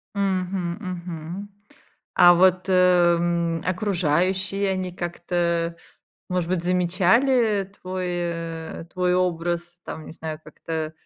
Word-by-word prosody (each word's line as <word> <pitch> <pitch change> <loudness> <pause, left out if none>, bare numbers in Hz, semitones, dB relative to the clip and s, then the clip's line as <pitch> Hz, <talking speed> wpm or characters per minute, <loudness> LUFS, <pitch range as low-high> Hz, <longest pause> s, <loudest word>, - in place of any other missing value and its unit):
Мгм, 185 -3 -1
мгм. 175 0 -6 0.7
А 175 0 +8
вот, 185 +1 +3
э, 180 -2 +5
м, 170 -1 0
окружающие, 185 +1 +1
они 185 -1 -2
как-то, 170 -1 -1 0.5
может 180 -2 -1
быть, 185 -2 0
замечали 195 +5 +3 0.2
твой, 185 0 -4
э, 165 -2 -4
твой 180 -1 +1
образ, 175 -1 -1
там 155 - -7
не - - -9
знаю, 160 -1 -6
как-то, 165 - -10
э, 160 -1 -1
175 Hz, 115 wpm, -24 LUFS, 170-185 Hz, 0.7 s, А